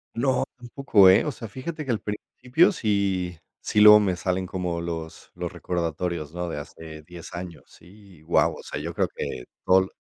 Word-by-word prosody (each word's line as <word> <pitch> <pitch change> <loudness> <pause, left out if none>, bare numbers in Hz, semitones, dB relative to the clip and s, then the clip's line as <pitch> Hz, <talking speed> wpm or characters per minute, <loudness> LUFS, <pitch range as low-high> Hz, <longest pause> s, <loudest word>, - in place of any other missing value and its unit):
No, 130 +2 +1
tampoco, 120 -5 +4
eh, 95 - +5
o 150 - -1
sea, 115 -3 -8
fíjate 150 +8 -6
que 130 - -1
al 110 - 0
principio 125 +8 +1
sí 100 - -1 0.2
sí 105 - +1
luego 105 0 +10
me 95 -3 +1
salen 90 +1 -1
como 90 -2 -3
los 80 -1 -6
los - - -4
recordatorios, 85 -2 -3
¿no?, 90 0 -3
de - - -4
hace 80 +1 -9
10 85 +1 -11
años, 85 -5 -7
sí, 100 +1 -18
y - - -22
guau, 80 +2 +2
o - - -11
sea, - - -5
yo 85 +3 -5
creo - - 0
que 60 - -5 0.2
todo 95 +1 +6
lo 95 - -3
90 Hz, 200 wpm, -25 LUFS, 85-105 Hz, 0.2 s, luego